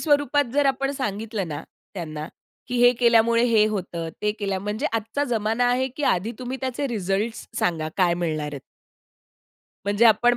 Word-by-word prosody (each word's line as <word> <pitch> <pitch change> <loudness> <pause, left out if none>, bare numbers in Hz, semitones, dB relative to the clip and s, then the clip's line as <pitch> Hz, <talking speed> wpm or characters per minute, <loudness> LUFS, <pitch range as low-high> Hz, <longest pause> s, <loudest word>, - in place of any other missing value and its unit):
स्वरूपात 290 -1 +3
जर 285 +1 +3
आपण 275 0 +1
सांगितलं 215 -6 -3
ना 150 0 -5 0.3
त्यांना, 155 -4 -5 0.4
की 250 - -2
हे 245 0 +7
केल्यामुळे 235 -1 +4
हे 225 -3 +4
होतं. 180 -5 -3
ते 210 0 +2
केल्यामुळे 200 -2 -3
म्हणजे 230 +8 -2
आजचा 225 +5 -1
जमाना 225 -1 +1
आहे, 255 +2 +1
की 265 +4 -8
आधी 210 0 +1
तुम्ही 255 +1 -4
त्याचे 260 +1 -2
रिजल्टस 210 0 -2
सांगा 160 -3 0
काय 180 -3 +3
मिळणार 160 -3 -2
आहेत. 140 - -6 1.2
म्हणजे 205 +3 +2
आपण 240 +2 +5
225 Hz, 160 wpm, -24 LUFS, 195-245 Hz, 1.2 s, हे